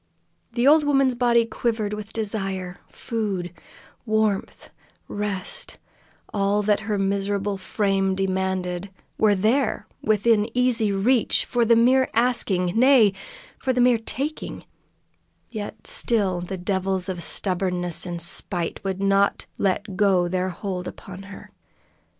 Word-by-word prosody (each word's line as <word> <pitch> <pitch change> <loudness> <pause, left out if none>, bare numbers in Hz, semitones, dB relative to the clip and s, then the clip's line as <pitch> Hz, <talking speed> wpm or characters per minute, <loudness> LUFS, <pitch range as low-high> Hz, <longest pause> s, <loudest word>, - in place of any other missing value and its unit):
The 240 +1 +1
old 305 +1 +6
woman's 275 -3 +3
body 240 -1 +3
quivered 225 -2 -2
with 210 0 -6
desire; 195 -4 -4
food, 195 -6 -4 0.5
warmth, 215 -3 -1 0.4
rest 205 -2 -3 0.6
all 205 +1 +1
that 205 0 +2
her 215 -1 -2
miserable 200 +1 -1
frame 195 0 0
demanded 190 -1 -2 0.3
were 210 -2 +4
there 225 +8 +1 0.2
within 215 +1 +2
easy 240 -4 +2
reach, 220 +5 +2
for 240 -1 +1
the 230 +1 +5
mere 255 +3 +4
asking; 215 -7 +1
nay 240 -4 +5 0.5
for 260 - 0
the 250 - -1
mere 245 -2 +4
taking; 275 +7 -4 0.9
yet 210 -1 -7
still 195 -6 0
the 185 +2 -5
devils 190 0 -1
of 180 -2 -4
stubbornness 180 -1 0
and 175 -2 -4
spite 170 0 -3
would 195 0 -3
not 195 0 +2
let 195 +1 -1
go 190 -3 +3
their 185 +1 -1
hold 180 0 -5
upon 190 0 -9
her. 200 - -11
200 Hz, 125 wpm, -24 LUFS, 190-230 Hz, 0.9 s, old